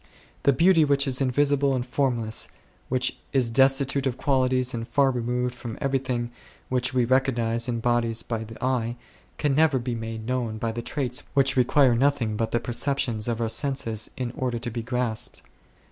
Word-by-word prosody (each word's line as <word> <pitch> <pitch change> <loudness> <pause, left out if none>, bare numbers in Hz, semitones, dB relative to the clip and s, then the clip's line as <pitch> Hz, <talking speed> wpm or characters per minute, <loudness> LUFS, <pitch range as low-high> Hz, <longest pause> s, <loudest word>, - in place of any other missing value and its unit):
The 140 - +4
Beauty 165 +4 +4
which 140 -1 +3
is 130 -1 +1
invisible 140 +1 +2
and 125 -1 -2
formless, 120 -4 0 0.4
which 130 0 0
is 125 -4 +2
desti 135 +2 +4
tute 135 +1 -1
of 125 -1 -2
qualities 130 -2 +1
and 115 -1 -4
far 135 +3 +3
removed 125 0 -1
from 120 -2 -7
every 135 -1 0
thing 120 -2 -3 0.4
which 125 0 +1
we 125 -2 +2
recognize 120 -2 +1
in 115 -1 -2
bodies 115 -1 +1
by 115 -2 -3
the 110 0 -10
eye, 120 -2 0 0.4
can 145 -2 +1
never 155 -1 +3
be 125 0 -3
made 110 -1 -5
known 120 -3 -2
by 115 +1 -2
the 120 +1 -4
traits 125 -1 -2
which 135 -1 +3
require 130 0 +4
nothing 120 -3 +1
but 115 +1 -1
the 120 - 0
perceptions 120 -2 -1
of 120 -1 -1
our 115 - 0
senses 115 -3 -1
in 125 -2 -3
order 125 -1 -2
to 120 +1 -5
be 115 +1 -4
grasped. 120 -2 -2
125 Hz, 185 wpm, -25 LUFS, 115-135 Hz, 0.4 s, The